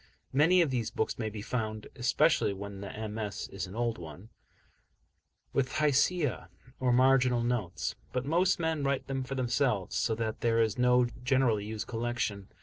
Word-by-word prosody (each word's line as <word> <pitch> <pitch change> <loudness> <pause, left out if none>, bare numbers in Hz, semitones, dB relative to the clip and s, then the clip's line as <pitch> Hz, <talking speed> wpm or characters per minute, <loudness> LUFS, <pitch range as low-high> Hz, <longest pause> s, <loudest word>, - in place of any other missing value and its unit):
Many 170 +6 +5
of 150 - -2
these 120 -4 -1
books 110 - -2
may 110 -2 -1
be 105 -1 -7
found 110 -3 -3
especially 130 -1 +2
when 100 0 -7
the 110 +2 -5
MS. 105 -2 -4
is 95 -1 -5
an 95 - -10
old 115 -2 -1
one 85 +6 -10 1.2
with 130 -1 0
Hashiyah, 145 - +1 0.3
or 130 -1 +2
marginal 125 -1 +4
notes, 120 -8 -1 0.2
but 125 0 -2
most 175 +6 +2
men 160 -3 0
write 140 -1 0
them 135 -1 -2
for 135 +1 -5
themselves, 125 -5 0
so 110 - +1
that 110 -1 -3
there 115 -1 +2
is 110 -2 +2
no 125 0 +5 0.2
generally 125 -5 +2
used 110 0 -4
collection. 115 -4 -3
120 Hz, 165 wpm, -30 LUFS, 110-135 Hz, 1.2 s, Many